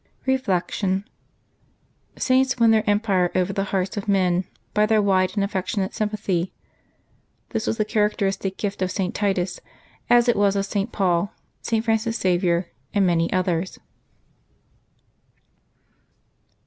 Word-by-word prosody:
Reflection. 195 -5 0 0.5
— - - -40
Saints 260 0 +2
win 230 -2 +5
their 220 -1 +2
empire 200 -4 +2
over 185 +1 +1
the 195 0 -1
hearts 190 0 -2
of 205 - -4
men 185 -2 +2 0.3
by 210 0 +3
their 220 0 +3
wide 190 -2 +2
and 200 - +1
affectionate 195 0 -2
sympathy. 205 -4 -1 1.0
This 225 -2 -3
was 225 - 0
the 215 - +1
characteristic 200 -2 0
gift 200 -2 -3
of 185 - +1
St. 185 -1 -2
Titus, 195 -3 -1 0.5
as 240 0 +5
it 240 - +4
was 200 -1 +3
of 200 0 0
St. 200 +3 -2
Paul, 185 0 +1 0.3
St. 225 -1 -1
Francis 225 0 +1
Xavier, 175 -1 +1 0.2
and 200 -1 +4
many 170 -2 +1
others. 185 -1 -1
195 Hz, 135 wpm, -23 LUFS, 185-215 Hz, 1.0 s, win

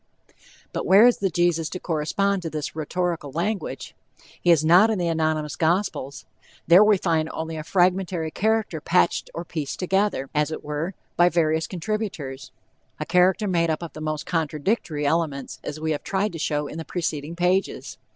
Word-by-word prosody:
But - - -3
where 200 +5 +7
is 245 - +5
the 195 - 0
Jesus 170 -2 +1
to 185 - -6
correspond 185 +5 0
to 165 - -4
this 155 -1 -5
rhetorical 165 -1 -2
language? 190 +7 -3 0.5
He 175 - +1
is 160 -2 +5
not 180 +7 +6
in 220 - 0
the 175 -2 -1
anonymous 155 -2 -1
gospels. 160 -5 -1 0.4
There 175 +5 +7
we 210 -1 +5
find 160 -3 0
only 160 0 -5
a 155 - -5
fragmentary 180 -2 +1
character 215 -6 0
patched 180 +2 +1
or 170 - -5
pieced 155 -4 -4
together, 190 -6 0
as 150 0 +1
it 160 - -6
were, 150 +5 -3 0.2
by 175 0 +6
various 160 -1 +1
contributors 170 -9 -4 0.5
a - - -3
character 185 +4 +3
made 170 -3 +1
up 160 +2 -1
of 170 - -7
the 155 - -9
most 155 0 -3
contradictory 160 -1 -1
elements, 140 -4 -1
as 150 +1 -5
we 160 0 -1
have 150 - -2
tried 195 0 -1
to 165 - -6
show 150 -2 -1
in 155 - -7
the - - -4
preceding 160 -2 -3
pages. 180 +2 -1
170 Hz, 180 wpm, -24 LUFS, 155-185 Hz, 0.5 s, where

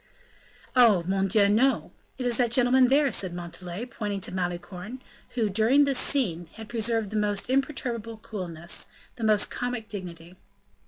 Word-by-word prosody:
"Oh! 225 -8 +6
mon 195 +2 0
Dieu! 200 +1 +4
no! 240 +7 +2 0.3
it 255 - -4
is 240 -2 +2
that 245 -2 +2
gentleman 250 +2 +4
there," 280 +1 +3
said 185 -3 -1
Montalais, 175 +4 -6
pointing 210 -5 -4
to - - -1
Malicorne, 180 +5 -4 0.4
who, 230 -3 +1
during 225 +8 +4
this 275 -2 +2
scene, 175 - 0
had 225 -1 -10
preserved 225 -2 0
the - - -5
most 210 +2 0
imperturbable 245 -5 -1
coolness, 180 -7 -4
and - - -25
the 220 -2 +2
most 210 -1 +2
comic 245 -3 -3
dignity. 175 -3 -8
215 Hz, 160 wpm, -27 LUFS, 185-245 Hz, 0.4 s, Oh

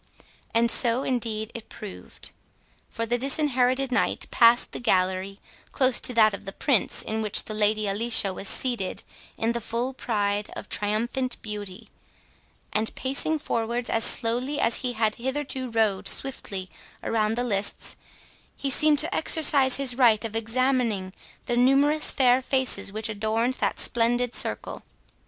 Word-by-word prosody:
And 230 0 +2
so 240 +1 +3
indeed 225 -3 -3
it 230 - -9
proved. 210 -3 -8 0.6
For 230 - -4
the 240 +2 -1
Disinherited 265 -1 +1
Knight 250 - -1
passed 235 +1 +4
the - - -7
gallery 190 -3 0 0.3
close 260 -3 +2
to - - +1
that 215 -2 +4
of 200 +1 -8
the 195 - -6
Prince, 235 +1 0
in 220 0 -3
which 210 -2 +3
the 215 - -7
Lady 215 0 0
Alicia 205 -1 +3
was 195 - -4
seated 240 -7 -2 0.3
in 225 +1 0
the 235 0 -4
full 235 +4 -3
pride 205 -4 -2
of - - -8
triumphant 235 +5 -1
beauty, 210 -1 -7 0.8
and, 220 +1 -1
pacing 275 +4 -1
forwards 235 -3 -3
as 225 - +1
slowly 250 +7 +2
as 230 - +3
he 250 -1 -3
had 220 -2 -1
hitherto 265 0 -4
rode 220 -4 0
swiftly 195 -8 -2 0.3
around 220 -1 0
the 245 - -2
lists, 205 -4 -1 0.6
he 275 - -2
seemed 305 +2 +3
to - - 0
exercise 285 -5 +5
his 270 -3 +3
right 235 -3 +3
of 225 -1 -6
examining 230 -4 -1 0.3
the 240 - -2
numerous 275 +5 +3
fair 255 -1 +3
faces 260 -7 0
which 220 +2 -3
adorned 220 +3 -1
that - - -2
splendid 240 +1 +1
circle. - - -1
235 Hz, 150 wpm, -25 LUFS, 215-255 Hz, 0.8 s, exercise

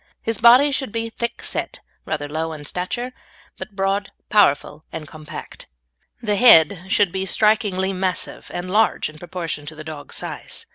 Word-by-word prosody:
His 225 -2 -2
body 250 +5 +7
should 265 -4 -2
be 230 +1 -3
thickset, 235 +1 -3 0.3
rather 150 -2 -2
low 160 +2 -3
in 150 -1 -9
stature, 240 +11 -4 0.5
but 210 - -8
broad, 195 +1 0 0.2
powerful, 160 -6 +3
and 155 -2 -6
compact. 155 0 -9 0.6
The 210 -2 +1
head 185 -6 +7
should 200 -1 +3
be 190 +1 -2
strikingly 200 -3 +2
massive 185 0 -2
and 175 +1 -5
large 215 -4 +2
in 155 - -15
proportion 165 -4 -5
to 160 - -7
the 155 - -8
dog's 155 -2 -7
size. - - -6
190 Hz, 155 wpm, -21 LUFS, 160-215 Hz, 0.6 s, body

